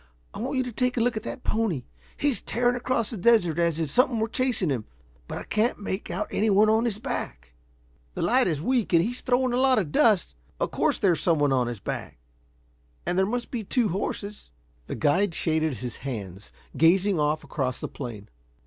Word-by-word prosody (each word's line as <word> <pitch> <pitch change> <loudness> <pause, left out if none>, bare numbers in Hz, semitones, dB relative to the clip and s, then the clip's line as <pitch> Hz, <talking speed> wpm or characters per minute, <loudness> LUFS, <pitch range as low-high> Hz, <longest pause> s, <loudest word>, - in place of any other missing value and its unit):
I - - -7
want 260 +4 -2
you 260 - +2
to 250 - -5
take 250 +2 0
a - - +3
look 240 0 +1
at 215 - -2
that 245 +3 -7
pony. 210 - 0 0.3
He's 285 -7 0
tearing 245 +1 +1
across 245 -2 -1
the 225 - -5
desert 180 -5 +3
as 170 -2 +1
if 155 -4 -2
something 250 - +3
were 220 - +1
chasing 240 - 0
him. 120 -5 -2 0.4
But - - -5
I - - -5
can't 215 +3 0
make 200 0 -4
out 210 +4 -2
anyone 215 0 +4
on 220 +2 +2
his 220 -4 0
back." - - -5 0.6
"The - - -2
light 255 -1 +3
is 155 -5 0
weak 240 - 0
and 165 0 +6
he's 245 +3 -4
throwing 255 -1 +1
a - - +1
lot 260 0 +4
of 170 -8 0
dust. 210 -1 +3 0.3
Of - - -1
course 290 - +1
there's 185 -6 +2
some 170 -2 +2
one 135 -4 +2
his 120 -3 -5
back, - - -5 0.9
and - - 0
there 190 +1 +2
must 245 +2 -3
be 235 -3 -3
two 230 +2 +1
horses." 200 +2 -4 0.4
The - - -4
guide 170 - +2
shaded 160 -3 0
his 120 +1 -5
hands, 100 -7 -7 0.2
gazing 180 +5 +4
off 150 +1 +1
across 130 -4 -3
the - - -4
plain. 115 -7 -8
200 Hz, 205 wpm, -26 LUFS, 155-240 Hz, 0.9 s, and